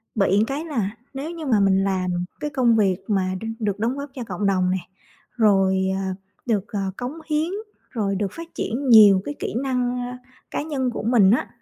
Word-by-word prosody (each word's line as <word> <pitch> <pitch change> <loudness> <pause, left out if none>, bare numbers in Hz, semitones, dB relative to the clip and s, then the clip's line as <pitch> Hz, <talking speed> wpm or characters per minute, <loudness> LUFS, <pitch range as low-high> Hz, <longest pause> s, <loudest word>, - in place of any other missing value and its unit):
bị 195 -2 +3
một - - +4
cái 285 +4 -3
là 235 - -1 0.2
nếu 280 +4 -5
như 330 -2 -7
mà 235 -7 +3
mình 195 -1 +3
làm 185 -2 0 0.3
cái 300 - -2
công 255 -5 +3
việc 195 -4 +3
mà 195 -4 +1
đ - - -5
được 205 -3 -1
đóng 235 +5 0
góp 280 +1 -5
cho 255 - -4
cộng 205 -2 -4
đồng 185 -2 +2
này, 185 -1 -3 0.5
rồi, 195 -4 +3
à, 190 -1 -2 0.3
được, 215 -4 0
à, 195 -2 -1
cống 250 +2 -4
hiến, 310 +1 0 0.4
rồi 205 -5 -1
được 195 -1 -2
phát 335 0 -10
triển 260 +4 -2
nhiều 205 -5 +8
cái 290 - -4
kỹ - - -3
năng, 250 -2 0
a, 245 0 -5 0.3
cá - - -1
nhân 275 -5 -1
của 235 - -5
mình 215 -4 +5
á, 240 - +2
220 Hz, 210 wpm, -23 LUFS, 195-260 Hz, 0.5 s, nhiều